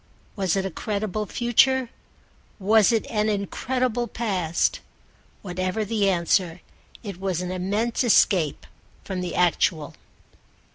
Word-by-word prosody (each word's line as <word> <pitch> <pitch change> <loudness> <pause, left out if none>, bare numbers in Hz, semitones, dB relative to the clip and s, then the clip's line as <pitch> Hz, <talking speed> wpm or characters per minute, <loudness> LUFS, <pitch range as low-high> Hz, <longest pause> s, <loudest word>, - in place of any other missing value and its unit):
Was 190 -4 0
it 195 -1 -1
a 190 - -3
credible 210 +2 -3
future? 250 +3 +2 0.7
Was 210 +1 +4
it 225 -2 +1
an 215 -1 0
incredible 240 +4 -1
past? 190 -8 -1 0.6
Whatever 185 +3 -2
the 205 -2 +1
answer 175 -1 +1 0.4
it 200 -5 -7
was 190 -3 -1
an 180 0 -4
immense 205 +7 -1
escape 185 - +3 0.4
from 190 -2 -4
the 180 - -4
actual. 165 -3 +1
200 Hz, 115 wpm, -24 LUFS, 180-225 Hz, 0.7 s, Was